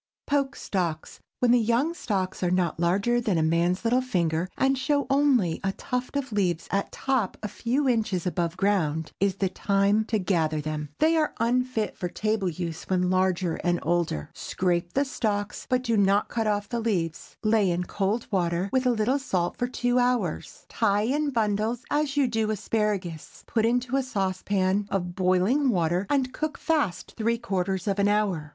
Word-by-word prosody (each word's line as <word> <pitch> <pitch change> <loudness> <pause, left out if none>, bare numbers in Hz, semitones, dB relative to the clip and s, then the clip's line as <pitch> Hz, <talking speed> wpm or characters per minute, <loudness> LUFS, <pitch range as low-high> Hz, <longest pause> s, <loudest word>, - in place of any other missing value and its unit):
POKE 280 -1 0
STALKS. 170 -5 -3 0.2
When 245 -1 +4
the 245 - +5
young 235 +8 +1
stalks 190 - -2
are 180 - +1
not 175 -3 0
larger 200 +8 +2
than 210 -7 0
a 160 - +2
man's 170 +4 +1
little 245 +2 +3
finger, 175 -8 0
and 270 0 +3
show 285 +2 0
only 265 - +3
a 195 0 0
tuft 250 +5 -3
of 275 -3 -3
leaves 180 -5 0
at 200 +1 -1
top 260 -8 -1
a - - -1
few 250 +7 -1
inches 215 -8 0
above 175 -1 -1
ground, 165 -6 0
is 195 -1 +1
the 195 -1 0
time 200 +3 +2
to 220 - 0
gather 165 -5 0
them. 150 0 -4
They 325 +1 +3
are 310 -1 0
unfit 240 -1 0
for 180 - -3
table 215 0 -1
use 170 -1 -5
when 180 -1 +1
larger 185 -2 +1
and 175 -1 0
older. 165 - -1
Scrape 175 -1 -1
the 280 +2 +2
stalks, 210 -6 -2
but 255 -1 +1
do 230 -2 +1
not 200 0 +3
cut 225 -2 -1
off 205 -1 0
the 235 - -2
leaves. 180 -8 -2
Lay 215 -3 +3
in 175 +1 0
cold 205 +5 -1
water, 180 0 0
with 260 -1 +2
a - - +5
little 245 +4 +1
salt, 185 -10 -1
for 245 - 0
two 245 0 0
hours. 245 -9 -1
Tie 205 -2 +1
in 290 +6 0
bundles, 220 0 0
as 290 -1 0
you 280 - +4
do 225 -2 0
asparagus, 205 -6 -2
put 225 -1 +1
into 245 +2 +1
a - - +2
saucepan 195 -3 0
of 180 -2 -2
boiling 190 +10 +2
water, 175 -1 +1
and 265 -3 +1
cook 310 0 -3
fast 290 - -1
three 230 +1 +1
quarters 195 -3 -2
of 200 0 0
an 200 - +3
hour. 200 -7 0
205 Hz, 185 wpm, -26 LUFS, 180-245 Hz, 0.2 s, the